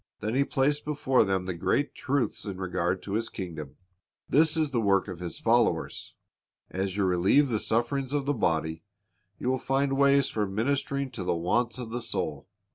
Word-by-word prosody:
Then 110 +2 -2
He 135 +2 +3
placed 140 +2 +1
before 140 -4 +2
them 95 -2 0
the 95 - -2
great 140 - 0
truths 140 -1 -1
in 100 -3 -5
regard 90 -1 -1
to 100 - -5
His 115 +2 -1
kingdom. 80 -7 -7 0.5
This 160 +2 +4
is 155 -3 +1
the 120 -3 +1
work 100 -2 +2
of 90 -3 -7
His 90 -2 -5
followers. - - +1 0.6
As 95 +1 -2
you 100 - +2
relieve 95 +10 +3
the 110 -3 0
sufferings 125 +5 0
of 145 -2 0
the 145 - +1
body, 80 - 0 0.6
you - - -5
will 130 0 +1
find 135 +1 0
ways 140 0 +4
for 105 -2 -1
ministering 135 +6 -1
to 95 - -5
the 90 - 0
wants 115 +8 0
of 120 -3 -6
the 120 +1 -3
soul. - - -3
115 Hz, 190 wpm, -28 LUFS, 95-140 Hz, 0.6 s, This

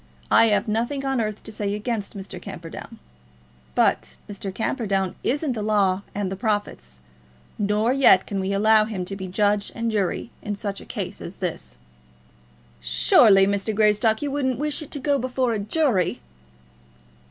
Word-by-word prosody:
"I - - +7
have 210 0 +2
nothing 240 +6 -1
on 270 -3 0
earth 215 -1 -4
to 220 - -8
say 205 -1 -2
against 210 -1 -3
Mr. 190 -2 -8
Camperdown. 165 -1 -9 0.8
But - - +1
Mr. 200 -1 -5
Camperdown 195 -3 -1
isn't 290 +2 0
the 220 - -4
law 200 -3 +2
and 200 -2 -2
the - - -2
prophets, 190 - -3 0.6
nor 210 +4 +1
yet 255 -9 +5
can 200 - -3
we 190 +1 -2
allow 215 +2 +4
him 200 -5 -4
to 195 - -5
be 190 -1 -6
judge 205 +2 +1
and 230 0 -1
jury 205 +2 -1
in 205 -1 -3
such 200 -1 -4
a - - -12
case - - -5
as - - -7
this." 60 0 -5 1.0
"Surely, 65 - +5
Mr. 200 +2 -1
Greystock, 215 +2 +3
you 285 - -2
wouldn't 260 -3 0
wish 300 +3 -2
it 305 - -8
to 290 - -4
go 280 +1 +1
before 255 -1 0
a 215 - -1
jury." 215 - +1
210 Hz, 165 wpm, -24 LUFS, 195-235 Hz, 1.0 s, I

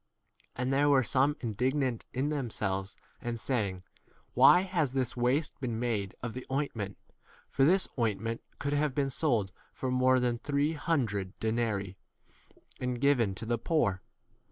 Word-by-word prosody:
4 125 - -2
And 130 +2 0
there 145 +2 +3
were 135 -2 +5
some 135 +5 +2
indignant 125 +2 -1
in 135 +3 -1
themselves 105 -9 -2 0.3
and 120 -1 -3
saying, 100 -8 -1 0.2
k - - -34 0.2
Why 135 +8 +7
has 170 -8 0
this 130 -3 -1
waste 130 +6 0
been 120 -4 -2
made 110 -6 -1
of 120 -2 -3
the 130 - -5
5 135 - 0
ointment? 115 -9 -3 0.5
for 135 - +3
this 185 +5 +4
ointment 115 0 -1
1 - - -37
could 145 0 -2
have 145 -2 +1
been 140 -2 0
sold 120 - +1 0.2
for 130 - -3
more 130 0 +4
than 120 -1 0
three 145 +3 0
hundred 115 - -1
denarii 110 -4 -1 0.8
and 125 -1 -2
given 125 -8 +3
to 115 - -6
the 120 0 -1
poor. 115 - +1
125 Hz, 165 wpm, -30 LUFS, 110-140 Hz, 0.8 s, Why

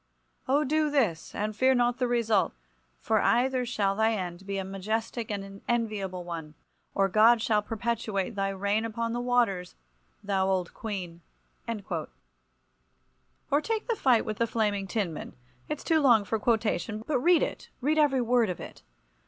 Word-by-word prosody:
Oh, 280 +3 +3
do 305 +2 +1
this, 225 - 0
and 215 +1 -2
fear 260 +4 +4
not 245 0 +1
the 250 - +1
result, 230 -5 +2 0.4
for - - +1
either 250 0 +2
shall 200 -5 0
thy 220 +2 +2
end 185 -2 -5
be 200 0 -2
a 195 - -2
majestic 215 +4 -3
and 200 -2 -3
an 195 0 -11
enviable 210 -6 -1
one; 165 -3 -7 0.4
or 195 0 +3
God 220 +4 +5
shall 215 -1 +2
perpetuate 220 -2 -2
thy 195 -1 -1
reign 200 +3 0
upon 230 +1 -2
the 240 - -2
waters, 235 -8 +1 0.5
thou 195 -2 +1
Old 185 -2 -1
Queen!" 185 -6 -6 0.5
Or 215 -4 -3 1.5
take 440 +4 -2
the 465 - +1
fight 255 - +3
with 215 -1 -3
the 230 - +2
Flaming 210 -3 0
Tinman. 190 -7 -3 0.3
It's 300 - -4
too 320 -1 +3
long 240 -8 +5
for 220 +2 -1
quotation—but 220 - 0
read 340 +4 +4
it, - - -5
read 300 +4 +1
every 275 -4 +3
word 240 -2 +2
of 180 - -4
it. - - -10
220 Hz, 160 wpm, -28 LUFS, 195-245 Hz, 1.5 s, God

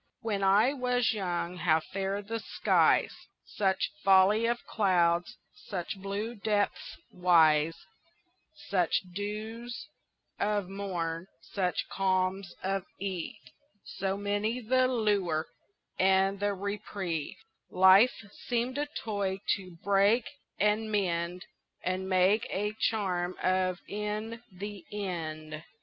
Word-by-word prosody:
WHEN 210 -4 -1
I 210 +7 +4
was 250 -3 +1
young 180 -3 -2
how 160 -2 +3
fair 195 +4 -3
the 225 +3 -4
skies, - - +2 0.3
Such 190 -2 0
folly 195 +4 +5
of 240 0 -1
cloud, 175 -4 +2 0.3
such 190 -3 -5
blue 200 +4 -3
depths 210 -2 -1
wise, 165 -3 +3 0.8
Such 180 -5 +2
dews 220 +4 -5 0.5
of 205 -2 0
morn, 180 -3 -3 0.3
such 185 -3 -1
calms 185 -1 0
of 195 0 -1
eve, 195 +1 -5 0.3
So 195 +1 -3
many 205 +4 -1
the 255 +2 +2
lure 205 -10 +1 0.5
and 190 +1 +3
the 205 0 0
reprieve 195 -5 -4 0.3
Life 190 +5 +5 0.2
seemed 245 +3 0
a 295 - -1
toy 200 -8 -3 0.2
to 185 -3 -12
break 200 +4 +4 0.3
and 210 +2 +2
mend 180 -3 -1 0.4
And 185 +1 -2
make 190 +3 +3
a 210 +2 -1 0.2
charm 185 -5 -1
of 185 -1 +1
in 210 +2 -4
the 200 0 -7
end. 160 -6 -5
195 Hz, 110 wpm, -30 LUFS, 180-210 Hz, 0.8 s, folly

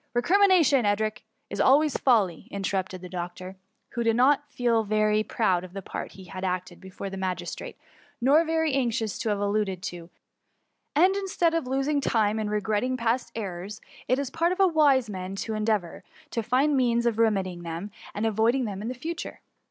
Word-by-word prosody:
" - - -50
Recrimination, 340 -1 +4
Edric, 215 +1 0 0.3
is 200 - -1
always 290 +2 +4
folly," 205 - +2
in 200 0 -5
terrupted 190 -1 -2
the 180 - -7
doctor, 180 +1 -6 0.4
who 235 - -3
did 225 -1 +2
not 270 +4 +5
now 290 - -32
feel 235 -4 +1
very 215 0 +2
proud 190 -5 0
of 185 -1 -10
the 195 -1 -6
part - - -6
he 190 - -12
had 185 +1 -8
acted 180 -1 -3
before 190 +1 -7
the 195 - -6
ma 185 -1 -1
gistrate, - - -7 0.4
nor 280 +7 +5
very 320 -2 0
anxious 230 -5 -1
to 230 -1 -1
have 205 - +1
it 205 - -2
alluded 200 -3 -1
to; 175 -4 -6 0.3
— - - -49
" - - -51
and 365 +6 +5
instead 370 -4 0
of 330 -6 -1
losing 275 +2 0
time 220 -4 +1
in 215 -1 -2
regretting 210 +4 0
past 235 +1 0
errors, 200 -1 -5 0.3
it 255 - +2
is 275 -2 -3
the - - -15
part 340 +1 +3
of 370 - -3
a 390 - +6
wise 290 -8 +4
man 190 -2 -5
to 220 +3 -4
en 215 0 -2
deavour 205 -6 -1 0.3
to 230 - -1
find 260 +6 +2
means 240 -2 +2
of 230 -2 +1
remedying 190 -6 +1
them, 170 +4 -6 0.2
and 210 - -1
avoiding 225 +4 +2
them 200 -2 -5
in 225 +4 -3
future. 330 +7 -6
220 Hz, 205 wpm, -26 LUFS, 195-265 Hz, 0.4 s, a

